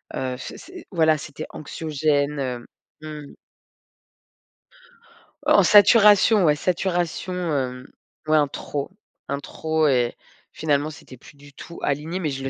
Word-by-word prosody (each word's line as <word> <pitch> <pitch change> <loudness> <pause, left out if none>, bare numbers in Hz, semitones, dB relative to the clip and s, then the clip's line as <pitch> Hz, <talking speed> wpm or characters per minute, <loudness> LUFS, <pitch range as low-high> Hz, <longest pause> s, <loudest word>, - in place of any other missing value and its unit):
heu, 130 -1 -3
f - - -8
c'est, 360 -1 -12
voilà, 160 -4 +3
c'était 150 +1 -8
anxiogène, 150 -1 -1
heu, 125 -3 -4 0.4
mmh. 150 -2 -9 2.1
En - - +5
saturation, 210 0 +6
ouais, 150 -1 +4
saturation, 175 +2 -2
hem, 135 -7 -3 0.4
ouais, 155 0 +4
un 145 - +3
trop 140 +1 -5 0.4
un 140 0 -3
trop 160 +2 -1
et 125 -3 +1 0.4
finalement 150 -1 -1
c'était 130 -4 -13
plus 145 - -17
du 145 0 -16
tout 170 - -11
aligné, 150 +6 -2
mais 160 -5 -2
je 135 -1 -5
le 135 - -2
150 Hz, 135 wpm, -23 LUFS, 140-170 Hz, 2.1 s, saturation